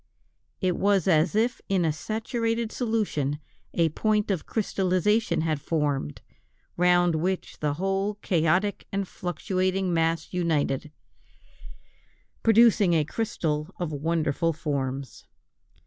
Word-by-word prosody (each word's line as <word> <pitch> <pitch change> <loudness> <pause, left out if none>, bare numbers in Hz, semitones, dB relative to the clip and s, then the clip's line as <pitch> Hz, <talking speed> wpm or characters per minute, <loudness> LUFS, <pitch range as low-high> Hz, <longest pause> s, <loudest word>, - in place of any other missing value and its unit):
It 185 -2 +1
was 200 -3 +2
as 165 +2 +3
if 235 +3 +1
in 190 -3 +2
a 155 - +1
saturated 225 +5 -2
solution, 210 - -1 0.4
a 165 -1 +3
point 210 +5 0
of 185 -5 -2
crystallization 190 -2 +1
had 155 -3 -1
formed, 145 - -1 0.5
round 175 0 +4
which 180 +4 -2
the 145 -1 -1
whole 195 +4 -1
chaotic 185 +1 0
and 195 -1 -2
fluctuating 185 +1 -1
mass 165 0 0
united, 155 -4 0 1.5
producing 225 -4 +5
a 160 -2 +3
crystal 160 -7 -2
of 175 -3 -3
wonderful 160 +2 0
forms. 140 -3 -4
175 Hz, 110 wpm, -26 LUFS, 155-205 Hz, 1.5 s, producing